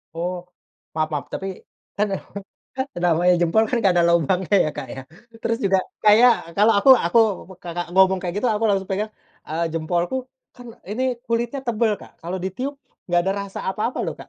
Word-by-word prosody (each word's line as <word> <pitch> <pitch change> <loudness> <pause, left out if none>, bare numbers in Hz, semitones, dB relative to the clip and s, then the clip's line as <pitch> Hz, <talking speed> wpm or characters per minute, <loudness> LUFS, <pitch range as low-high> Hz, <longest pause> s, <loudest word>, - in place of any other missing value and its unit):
Oh. 180 +2 -2 0.6
Maaf 155 0 0
maaf. 145 - -2
Tapi, 195 - -4 0.5
kan 210 +1 +2 0.7
kan 260 - -1 0.2
namanya 175 +2 +4
jempol 175 +6 +3
kan 250 - +1
nggak 195 -5 +3
ada 175 -1 +4
lubangnya 180 +4 +1
ya, - - 0
Kak, - - -5
ya. 135 - -7 0.4
Terus 230 0 0
juga, 190 -1 +3 0.3
kayak 230 +4 +7 0.2
kalau 215 +3 +5
aku 235 - +2 0.2
aku, 200 +7 +3 0.4
Kakak 175 0 -4
ngomong 190 0 +5
kayak 180 -1 -4
gitu, 230 +5 0
aku 215 +1 0
langsung 195 -1 0
pegang, 210 +3 -1 0.4
eee, 160 +2 -1
jempolku 170 +5 -1 0.4
kan, 245 -1 -13 0.2
ini 235 +5 -2 0.2
kulitnya 235 +4 -1
tebel, 230 -2 +1
Kak. - - -13
Kalau 175 +3 -4
ditiup, 250 +10 -3 0.3
enggak 175 -1 +2
ada 190 +2 0
rasa 200 -1 -7
apa-apa 215 +6 -2
loh, - - -3
Kak. - - -12
190 Hz, 180 wpm, -22 LUFS, 175-220 Hz, 0.7 s, kayak